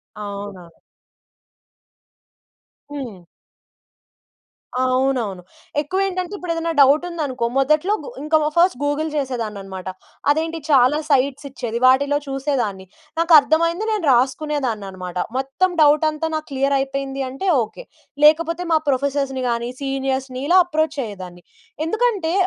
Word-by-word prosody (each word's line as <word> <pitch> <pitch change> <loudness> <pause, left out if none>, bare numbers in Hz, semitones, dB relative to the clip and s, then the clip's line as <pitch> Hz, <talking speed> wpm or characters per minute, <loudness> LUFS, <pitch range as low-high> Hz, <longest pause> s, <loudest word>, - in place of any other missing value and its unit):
అవునవును. 200 -5 -8 2.1
హ్మ్. 255 -9 -6 1.7
అవునవును. 255 -7 0 0.4
ఎక్కువేంటంటే, 370 +3 -2
ఇప్పుడేదెనా 335 -2 -2
డౌటుందనుకో. 285 -3 +2
మొదట్లో 305 +9 +2
గు - - -7
ఇంక 310 +1 +1
మ - - +1
ఫస్ట్ 345 -6 +4
గూగుల్ 295 +2 0
చేసేదాన్ననమాట. 210 -9 -4 0.4
అదేంటి! 325 +2 0
చాలా 270 +1 +5
సైట్సిచ్చేది. 270 -3 -1
వాటిలో 280 +3 +4
చూసేదాన్ని. 260 -9 -2 0.3
నాకర్థమైంది 335 +4 +4
నేను 415 -7 -1
రాసుకునేదాన్ననమాట. 235 - -1 0.2
మొత్తం 270 +8 0
డౌటంతా 305 +1 +3
నాకు 310 - -4
క్లియరయిపోయింది 275 0 -1
అంటే, 275 +9 -5 0.2
ఓకే. - - -10 0.4
లేకపోతే 335 +3 +4
మా - - +6
ప్రొఫెసర్స్‌ని 275 -1 0
గాని, 235 +1 -1
సీనియర్స్‌ని, 270 -1 -2
ఇలా 365 - +5
అప్రోచ్ 315 -3 -1
అయ్యేదాన్ని. 180 -4 -9 0.4
ఎందుకంటే, 405 -4 0
275 Hz, 95 wpm, -21 LUFS, 250-315 Hz, 2.1 s, మా